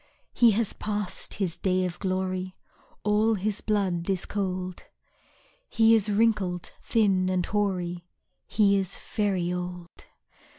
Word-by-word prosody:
He 235 Hz, -, +6 dB
has 220 Hz, 0 st, 0 dB
passed 210 Hz, -3 st, -4 dB
his 185 Hz, -5 st, -2 dB
day 185 Hz, -1 st, +1 dB
of 175 Hz, -1 st, -5 dB
glory, 185 Hz, -1 st, -2 dB, 0.5 s
All 215 Hz, +2 st, +3 dB
his 205 Hz, +1 st, -2 dB
blood 190 Hz, -5 st, 0 dB
is 190 Hz, -2 st, 0 dB
cold, 185 Hz, -2 st, -3 dB, 0.8 s
He 225 Hz, 0 st, +5 dB
is 215 Hz, -2 st, +3 dB
wrinkled, 205 Hz, -5 st, +1 dB
thin, 195 Hz, -5 st, +2 dB
and 185 Hz, -1 st, +1 dB
hoary, 180 Hz, -4 st, -1 dB, 0.4 s
He 200 Hz, -1 st, +3 dB
is 190 Hz, -1 st, -3 dB
very 190 Hz, -4 st, -1 dB
old. 180 Hz, -1 st, -5 dB
190 Hz, 125 wpm, -27 LUFS, 180-210 Hz, 0.8 s, He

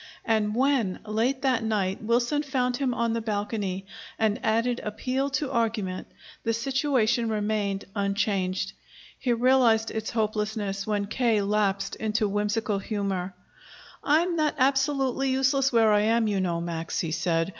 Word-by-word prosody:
And 215 Hz, -2 st, +1 dB
when, 255 Hz, -7 st, +2 dB
late 235 Hz, +6 st, 0 dB
that 255 Hz, -4 st, +2 dB
night, 200 Hz, -4 st, -1 dB
Wilson 240 Hz, +6 st, +1 dB
found 255 Hz, -4 st, -1 dB
him 265 Hz, -2 st, 0 dB
on 235 Hz, -1 st, 0 dB
the 230 Hz, -, -1 dB
balcony 205 Hz, -3 st, -3 dB, 0.3 s
and 220 Hz, -2 st, +1 dB
added 230 Hz, +2 st, +1 dB
appeal 255 Hz, +6 st, -2 dB
to 275 Hz, -1 st, -3 dB
argument, 220 Hz, -6 st, -1 dB, 0.3 s
the 230 Hz, -, 0 dB
situation 240 Hz, -2 st, +1 dB
remained 210 Hz, -2 st, -1 dB
unchanged. 195 Hz, -2 st, -1 dB, 0.5 s
He 250 Hz, -, 0 dB
realized 235 Hz, -2 st, +3 dB
its 220 Hz, 0 st, -3 dB
hopelessness 210 Hz, -2 st, -2 dB
when 205 Hz, -1 st, 0 dB
K. 220 Hz, -1 st, +1 dB
lapsed 200 Hz, -1 st, 0 dB
into 220 Hz, 0 st, 0 dB
whimsical 210 Hz, +1 st, -1 dB
humor. 195 Hz, -3 st, -3 dB, 0.7 s
"I'm 335 Hz, +4 st, +2 dB
not 305 Hz, -2 st, +1 dB
absolutely 270 Hz, 0 st, +1 dB
useless 270 Hz, +1 st, +2 dB
where 225 Hz, -3 st, +4 dB
I 210 Hz, -, +5 dB
am, 225 Hz, +1 st, +2 dB
you 205 Hz, -2 st, 0 dB
know, 170 Hz, -2 st, -1 dB
Max," 165 Hz, -1 st, -3 dB
he 165 Hz, -, -3 dB
said. 165 Hz, +1 st, 0 dB
220 Hz, 145 wpm, -26 LUFS, 200-250 Hz, 0.7 s, I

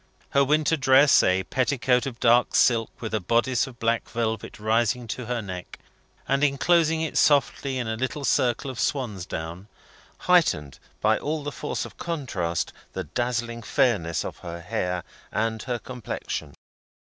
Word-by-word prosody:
Her 140 Hz, -, +4 dB
winter 150 Hz, +3 st, +2 dB
dress 135 Hz, +1 st, +6 dB
a 90 Hz, +1 st, +2 dB
petticoat 130 Hz, 0 st, +1 dB
of 120 Hz, -3 st, -7 dB
dark 120 Hz, +1 st, +4 dB
silk, 115 Hz, -2 st, +4 dB
with 110 Hz, -, -4 dB
a 110 Hz, -, +2 dB
bodice 120 Hz, +6 st, +1 dB
of 125 Hz, -2 st, -11 dB
black 115 Hz, 0 st, 0 dB
velvet 110 Hz, -2 st, -3 dB
rising 115 Hz, +2 st, +1 dB
to 120 Hz, +1 st, -4 dB
her 120 Hz, -2 st, -2 dB
neck, 90 Hz, -2 st, -7 dB, 0.5 s
and 135 Hz, +1 st, +1 dB
enclosing 160 Hz, +3 st, +3 dB
it 160 Hz, -, 0 dB
softly 140 Hz, -2 st, +2 dB
in 125 Hz, -2 st, -2 dB
a 110 Hz, -, -1 dB
little 130 Hz, +4 st, -3 dB
circle 130 Hz, +2 st, +1 dB
of 125 Hz, -, -9 dB
swansdown 95 Hz, -, -3 dB, 0.5 s
heightened, 155 Hz, -, +2 dB, 0.2 s
by 110 Hz, +1 st, +3 dB
all 150 Hz, 0 st, -3 dB
the 145 Hz, -, -3 dB
force 150 Hz, -, -4 dB
of -, -, -12 dB
contrast, 105 Hz, -, -2 dB, 0.2 s
the -, -, -3 dB
dazzling 120 Hz, -1 st, -2 dB
fairness 90 Hz, -, +1 dB
of -, -, -6 dB
her 85 Hz, -1 st, -7 dB
hair 90 Hz, 0 st, -2 dB, 0.3 s
and 110 Hz, +1 st, -1 dB
her 125 Hz, -2 st, -2 dB
complexion. 125 Hz, -2 st, -6 dB
120 Hz, 155 wpm, -25 LUFS, 110-135 Hz, 0.5 s, dress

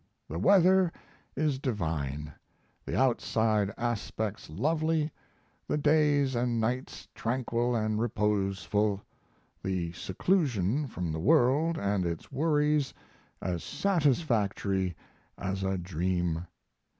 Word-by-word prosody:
The 80 Hz, -, -4 dB
weather 185 Hz, -, +5 dB, 0.4 s
is 145 Hz, -2 st, 0 dB
divine, 75 Hz, -, -2 dB, 0.5 s
the -, -, -1 dB
outside 110 Hz, -5 st, +2 dB
aspects 110 Hz, -4 st, -3 dB
lovely, 155 Hz, -, 0 dB, 0.6 s
the -, -, 0 dB
days 145 Hz, -2 st, +3 dB
and 120 Hz, -1 st, 0 dB
nights 125 Hz, +4 st, -2 dB
tranquil 120 Hz, 0 st, -1 dB
and 110 Hz, -1 st, 0 dB
reposeful, 105 Hz, -2 st, 0 dB, 0.6 s
the 90 Hz, -3 st, -2 dB
seclusion 125 Hz, -, 0 dB
from 90 Hz, -8 st, -4 dB
the 80 Hz, -, -3 dB
world 150 Hz, -, +3 dB
and 100 Hz, -4 st, 0 dB
its 85 Hz, -, -4 dB
worries 150 Hz, 0 st, +1 dB, 0.5 s
as 90 Hz, -3 st, -2 dB
satisfactory 120 Hz, -, +1 dB, 0.4 s
as 95 Hz, +1 st, -3 dB
a 95 Hz, 0 st, 0 dB
dream. 90 Hz, -1 st, -1 dB
115 Hz, 100 wpm, -29 LUFS, 95-145 Hz, 0.6 s, weather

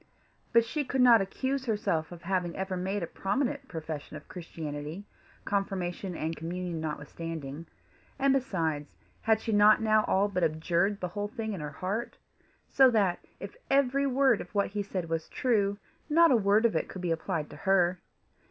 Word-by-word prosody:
But 230 Hz, 0 st, +5 dB
she 295 Hz, +6 st, -2 dB
could 265 Hz, 0 st, -2 dB
not 235 Hz, -3 st, +7 dB
accuse 265 Hz, +7 st, -2 dB
herself 205 Hz, -9 st, -1 dB
of 175 Hz, -1 st, -10 dB
having 180 Hz, -1 st, -1 dB
ever 190 Hz, 0 st, -3 dB
made 190 Hz, +2 st, -2 dB
a -, -, 0 dB
prominent 265 Hz, -, -2 dB
profession 155 Hz, -2 st, -6 dB
of 150 Hz, -, -14 dB
Christianity, 160 Hz, 0 st, -6 dB, 0.4 s
confirmation 190 Hz, -2 st, -2 dB
and 160 Hz, +1 st, -3 dB
communion 170 Hz, +1 st, -4 dB
notwithstanding; 155 Hz, 0 st, -6 dB, 0.5 s
and 275 Hz, 0 st, +3 dB
besides, 165 Hz, -, -1 dB, 0.3 s
had 220 Hz, 0 st, +3 dB
she 225 Hz, -, -2 dB
not 210 Hz, 0 st, +6 dB
now 215 Hz, -1 st, +3 dB
all 195 Hz, +2 st, +2 dB
but 185 Hz, -3 st, -1 dB
abjured 170 Hz, +5 st, +1 dB
the 180 Hz, -, -2 dB
whole 205 Hz, +3 st, -3 dB
thing 220 Hz, -1 st, -4 dB
in 185 Hz, -, -5 dB
her 150 Hz, -, -4 dB
heart? 190 Hz, +10 st, -4 dB, 0.5 s
so 265 Hz, -1 st, +6 dB
that, 200 Hz, -7 st, +2 dB, 0.2 s
if -, -, -8 dB
every 275 Hz, 0 st, +3 dB
word 265 Hz, -3 st, +3 dB
of 180 Hz, -, -9 dB
what 200 Hz, -, +2 dB
he 205 Hz, +1 st, -2 dB
said 190 Hz, -4 st, -4 dB
was 165 Hz, -1 st, -3 dB
true, 205 Hz, -5 st, +1 dB, 0.3 s
not 330 Hz, +1 st, +6 dB
a -, -, +6 dB
word 210 Hz, +1 st, +3 dB
of 230 Hz, -, +2 dB
it -, -, -1 dB
could 185 Hz, -, -7 dB
be 175 Hz, -, 0 dB
applied 165 Hz, -1 st, -2 dB
to -, -, -9 dB
her! 180 Hz, 0 st, +2 dB
195 Hz, 180 wpm, -29 LUFS, 165-225 Hz, 0.5 s, not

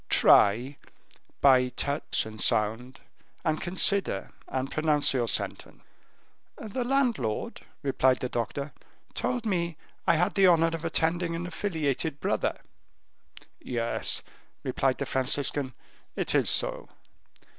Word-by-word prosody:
Try, 120 Hz, +8 st, +4 dB, 0.6 s
by 130 Hz, -2 st, +5 dB
touch 140 Hz, +3 st, -1 dB
and 110 Hz, -1 st, -7 dB
sound, 115 Hz, +5 st, +1 dB, 0.4 s
and 155 Hz, -1 st, 0 dB
consider 185 Hz, -, +2 dB, 0.2 s
and 130 Hz, +1 st, -3 dB
pronounce 155 Hz, -2 st, +3 dB
your 120 Hz, -3 st, 0 dB
sentence." 100 Hz, -, -3 dB, 0.7 s
"The 220 Hz, +4 st, -4 dB
landlord," 240 Hz, -, -1 dB, 0.2 s
replied 130 Hz, -2 st, +2 dB
the 125 Hz, -, -2 dB
doctor, 140 Hz, +5 st, -4 dB, 0.4 s
"told 245 Hz, -2 st, -2 dB
me 170 Hz, -6 st, -1 dB, 0.3 s
I 170 Hz, -, +5 dB
had 180 Hz, +5 st, +1 dB
the 195 Hz, -2 st, +4 dB
honor 165 Hz, -2 st, +4 dB
of 165 Hz, 0 st, -5 dB
attending 165 Hz, +1 st, 0 dB
an 170 Hz, +1 st, -4 dB
affiliated 160 Hz, -5 st, -2 dB
brother." -, -, -1 dB, 1.0 s
"Yes," 115 Hz, -2 st, -1 dB, 0.4 s
replied 130 Hz, 0 st, 0 dB
the 140 Hz, -, -3 dB
Franciscan, 130 Hz, 0 st, 0 dB, 0.4 s
"it -, -, -2 dB
is -, -, +3 dB
so. -, -, +2 dB
145 Hz, 115 wpm, -27 LUFS, 130-170 Hz, 1.0 s, by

